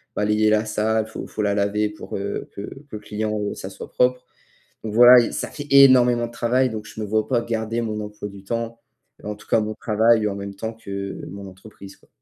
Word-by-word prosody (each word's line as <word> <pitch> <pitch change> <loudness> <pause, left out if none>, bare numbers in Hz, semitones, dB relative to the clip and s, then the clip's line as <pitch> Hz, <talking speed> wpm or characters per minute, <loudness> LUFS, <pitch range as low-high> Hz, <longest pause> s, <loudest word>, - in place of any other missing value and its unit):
balayer 105 +1 +2
la 110 0 +3
salle, 110 +1 0
faut 110 - -7
faut - - -5
la 100 -1 +1
laver 105 +1 0
pour, 105 - -8
heu, 100 +1 -4
que 100 - -6
que 135 +7 -9
le 105 - -6
client, 105 0 -3
heu, - - -4
ça 95 - -7
soit 95 - -10
propre, 125 0 +1 0.6
donc 110 -1 -4
voilà, 125 +2 +9
y 120 - -1
ça - - -3
fait 145 -2 -8
énormément 125 -3 +6
de - - -15
travail, 125 +2 +1
donc 110 -1 -6
je 110 - -9
me 105 - -3
vois 110 +1 0
pas 125 -3 +1
garder 115 0 -2
mon 110 -2 -3
emploi 105 0 -7
du 100 -1 -13
temps, 115 +2 -4 0.4
en 105 - -4
tout 105 - -18
cas - - +3
mon 110 0 -3
travail 110 0 +2
en 100 - -4
même 100 0 -6
temps 110 +3 -5
que 100 -3 -6
mon 100 +1 -9
entreprise, 95 +1 -13
quoi. - - -28
110 Hz, 230 wpm, -22 LUFS, 105-115 Hz, 0.6 s, voilà